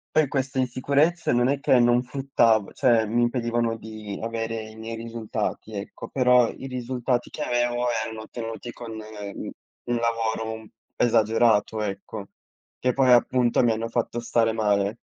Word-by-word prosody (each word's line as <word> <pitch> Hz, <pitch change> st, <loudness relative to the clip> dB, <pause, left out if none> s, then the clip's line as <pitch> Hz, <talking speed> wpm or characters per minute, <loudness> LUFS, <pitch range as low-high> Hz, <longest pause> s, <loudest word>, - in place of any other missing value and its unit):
Poi 155 Hz, -2 st, +4 dB
queste 135 Hz, 0 st, -2 dB
insicurezze 140 Hz, +7 st, +1 dB
non 120 Hz, +1 st, +3 dB
è 140 Hz, +1 st, 0 dB
che 130 Hz, -3 st, +4 dB
non 120 Hz, +1 st, +4 dB
fruttav 125 Hz, -5 st, +1 dB
cioè, 115 Hz, -3 st, +3 dB
mi 120 Hz, +2 st, +1 dB
impedivano 120 Hz, -1 st, 0 dB
di 110 Hz, -2 st, -8 dB
avere 115 Hz, 0 st, -3 dB
i 110 Hz, -, -13 dB
miei 115 Hz, +1 st, -6 dB
risultati, 110 Hz, -1 st, -4 dB
ecco, 100 Hz, 0 st, -7 dB
però 125 Hz, -2 st, +4 dB
i 135 Hz, -, -8 dB
risultati 125 Hz, -1 st, -2 dB
che -, -, -8 dB
avevo 120 Hz, 0 st, 0 dB, 0.2 s
erano 110 Hz, -1 st, -6 dB
ottenuti 115 Hz, +1 st, -6 dB
con, 115 Hz, -2 st, -8 dB
mhmm, 105 Hz, -2 st, -7 dB, 0.4 s
un 120 Hz, -, 0 dB
lavoro 115 Hz, -1 st, -1 dB
un 110 Hz, -1 st, -13 dB, 0.3 s
esagerato, 110 Hz, -1 st, +3 dB
ecco, 100 Hz, 0 st, -5 dB, 0.5 s
che 125 Hz, -, +1 dB
poi 130 Hz, 0 st, +2 dB
appunto 120 Hz, 0 st, +3 dB
mi 115 Hz, -, +4 dB
hanno 115 Hz, +1 st, -2 dB
fatto 120 Hz, 0 st, -2 dB
stare 115 Hz, -1 st, +1 dB
male. 105 Hz, -1 st, +1 dB
115 Hz, 155 wpm, -25 LUFS, 110-125 Hz, 0.5 s, Poi